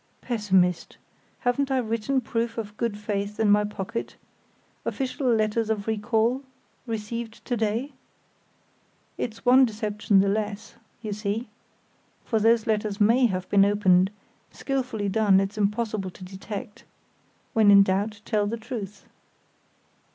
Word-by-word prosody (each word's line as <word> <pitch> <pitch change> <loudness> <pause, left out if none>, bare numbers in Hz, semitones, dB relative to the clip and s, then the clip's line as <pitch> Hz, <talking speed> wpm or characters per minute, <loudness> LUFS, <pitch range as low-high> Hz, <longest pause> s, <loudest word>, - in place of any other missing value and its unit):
"Pessimist! 190 -7 +1 0.4
Haven't 270 +3 +1
I 265 - +1
written 235 +3 0
proof 230 0 -2
of 210 -2 -5
good 225 -2 -2
faith 205 0 -3
in 215 -2 +4
my 210 0 +5
pocket—official 255 +6 -6
letters 220 0 +1
of 210 -2 -1
recall, 225 +3 +1 0.5
received 225 +1 -5
to 245 - -1
day? 225 +5 -1 1.3
It's 230 +1 -5
one 255 +2 +7
deception 210 -3 +1
the 200 - +1
less, 205 0 -2 0.3
you 215 -1 -3
see; 210 +2 -3 0.8
for 225 - +1
those 225 +1 +3
letters 210 -1 -1
may 235 +4 +5
have 185 -3 -3
been 200 -1 +5
opened; 190 -2 +4 0.4
skilfully 255 -6 -2
done 200 -1 +4
it's 195 +1 -2
impossible 210 -1 -1
to 185 - -13
detect. 200 +2 -8 0.7
When 220 -2 +5
in 200 -1 +8
doubt, 205 +2 -1
tell 210 -2 +1
the 230 +3 -3
truth!" 215 -4 -7
215 Hz, 130 wpm, -25 LUFS, 205-230 Hz, 1.3 s, in